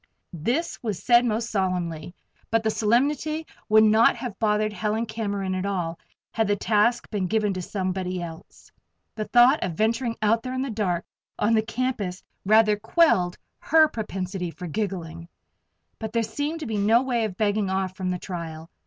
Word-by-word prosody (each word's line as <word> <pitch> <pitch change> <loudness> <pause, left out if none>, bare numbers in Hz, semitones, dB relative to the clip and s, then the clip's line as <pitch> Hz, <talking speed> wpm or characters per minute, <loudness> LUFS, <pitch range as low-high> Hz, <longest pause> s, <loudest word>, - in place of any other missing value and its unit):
This 240 - -2
was 215 -6 -2
said 240 0 +5
most 230 0 -1
solemnly; 180 -4 -2 0.3
but 225 0 +1
the 220 - +1
solemnity 280 +9 +1 0.2
would 215 0 +6
not 220 +1 +5
have 245 -6 -6
bothered 215 -1 +1
Helen 215 +2 -1
Cameron 200 -4 -3
at 185 0 -2
all, 175 -4 -2 0.3
had 225 -2 0
the 205 - +2
task 215 +4 +1
been 200 -4 -1
given 210 0 +1
to 185 - -4
somebody 185 -1 -3
else! 165 -2 -10 0.4
The 215 - -4
thought 245 +5 +5
of 180 - -2
venturing 230 +5 0
out 225 +2 +3
there 255 +1 -5
in 260 - -1
the 270 - -3
dark 185 -5 -1 0.3
on 220 +2 +2
the 220 - +4
campus 220 -5 -3 0.2
rather 215 0 +5
quelled 210 - +2 0.2
her 315 0 +5
propensity 190 - -4
for 180 +2 -9
giggling. 170 -3 -4 0.7
But 220 0 -5
there 230 -1 +2
seemed 290 +9 -3
to - - -4
be 220 -2 -2
no 225 +5 +4
way 245 -3 0
of 200 -4 -3
begging 205 -2 +1
off 190 -1 -1
from 185 -1 -3
the 180 - -1
trial. 165 -3 -7
210 Hz, 175 wpm, -25 LUFS, 185-230 Hz, 0.7 s, would